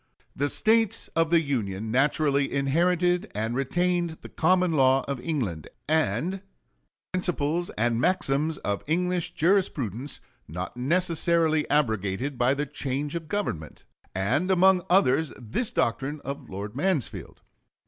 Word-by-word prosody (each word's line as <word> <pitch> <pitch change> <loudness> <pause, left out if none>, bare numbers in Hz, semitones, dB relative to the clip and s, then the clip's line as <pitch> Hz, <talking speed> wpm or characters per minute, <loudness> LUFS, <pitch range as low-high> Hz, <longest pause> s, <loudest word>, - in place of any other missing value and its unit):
The 145 +1 0
States 225 +2 +2
of 165 -1 +1
the 170 -1 +4
Union 110 -7 -3
naturally 140 +2 +2
inherited 175 +6 +1
and 110 +2 -2
retained 175 +4 0
the - - -9
common 180 +1 +2
law 135 -3 +3
of 140 -2 -3
England, 120 - -3 0.2
and 155 - +1
the 195 - -7 0.7
principles 175 -2 -1
and 115 +1 +1
maxims 155 -2 +1
of 100 -1 -3
English 180 +2 0
jurisprudence 145 - 0 0.3
not 90 +7 -6
necessarily 165 +2 +1
abrogated 120 -1 0
by 125 +3 +3
the 145 +1 -2
change 140 0 -3
of 165 -2 -5
government, 155 - -4 0.3
and 120 - 0
among 190 0 +5
others 160 -4 +3
this 125 - 0
doctrine 135 +6 -1
of 140 +1 -7
Lord 100 +3 -6
Mansfield. 155 - -2
145 Hz, 130 wpm, -26 LUFS, 125-175 Hz, 0.7 s, among